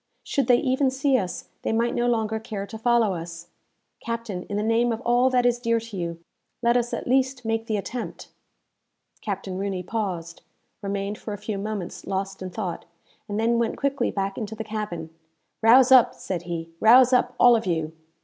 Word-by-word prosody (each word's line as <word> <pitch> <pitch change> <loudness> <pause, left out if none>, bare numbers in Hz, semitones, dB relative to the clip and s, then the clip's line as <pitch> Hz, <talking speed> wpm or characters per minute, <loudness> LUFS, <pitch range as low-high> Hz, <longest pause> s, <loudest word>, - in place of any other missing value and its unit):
Should 275 -4 0
they 245 - +6
even 265 +1 +1
see 270 +1 +1
us, 180 -3 -5
they - - -1
might 230 +2 +1
no 240 0 +1
longer 220 -2 0
care 215 -3 -5
to 220 - -8
follow 235 -3 +3
us. 170 0 -7 0.5
Captain, 230 -6 -5
in 205 - -2
the 210 - 0
name 230 +2 +2
of 225 - -2
all 245 +1 +3
that 250 -1 +2
is 240 0 +3
dear 230 -1 +1
to 225 -2 -9
you, 170 -2 -4 0.4
let 235 +1 +4
us 240 -1 +1
at - - -3
least 260 -1 +1
make 225 0 -1
the 215 - 0
attempt!" 235 +4 -6 0.9
Captain 195 -2 -4
Rooney 195 -2 -2
paused, 180 -5 -4 0.4
remained 200 +1 -3
for 210 - -5
a - - -9
few 205 0 -4
moments 200 -3 -5
lost 195 0 -3
in 185 - -4
thought, 180 -3 -5 0.4
and 205 +1 -2
then 230 +1 +2
went 235 - -1
quickly 280 0 0
back 195 0 -3
into 220 -1 -5
the 220 - -5
cabin. 205 -7 -5 0.5
"Rouse 250 +3 +6
up!" 255 -3 +7
said 180 -3 -4
he, 165 -1 -4
"rouse 250 +3 +7
up, 250 0 +2
all 245 -1 +7
of 220 -4 -1
you! 160 -2 -1
220 Hz, 195 wpm, -25 LUFS, 195-240 Hz, 0.9 s, up